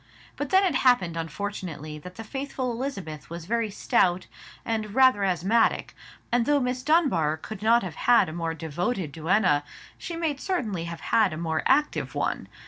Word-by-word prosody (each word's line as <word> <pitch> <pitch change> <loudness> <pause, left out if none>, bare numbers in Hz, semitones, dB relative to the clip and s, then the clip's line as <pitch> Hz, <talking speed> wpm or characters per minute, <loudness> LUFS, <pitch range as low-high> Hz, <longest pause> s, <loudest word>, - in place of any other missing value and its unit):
But 290 -1 -4
then 380 +1 +5
it 360 - +1
happened 245 -12 +3
unfortunately 165 -3 -5
that 180 +4 -11
the 225 - -7
faithful 265 +1 -4
Elizabeth 195 - -5
was 170 0 -7
very 230 +2 0
stout, 185 -2 +1 0.4
and 215 -2 -2
rather 260 -6 +5
asthmatic; 195 +5 +1 0.4
and 235 -1 +2
though 290 -1 +4
Miss 250 -1 -1
Dunbar 255 - +2
could 205 +5 -8
not 230 +1 +4
have 180 -4 -5 0.2
had 240 - +6
a 155 - -6
more 165 -1 -3
devoted 165 +3 -3
duenna, 160 -1 +2 0.4
she 340 - -5
might 320 -4 -2
certainly 215 - -2
have 170 -1 -7
had 215 -7 +2
a - - -5
more 160 -1 -1
active 295 +3 +1
one. - - -2
205 Hz, 170 wpm, -26 LUFS, 165-250 Hz, 0.4 s, had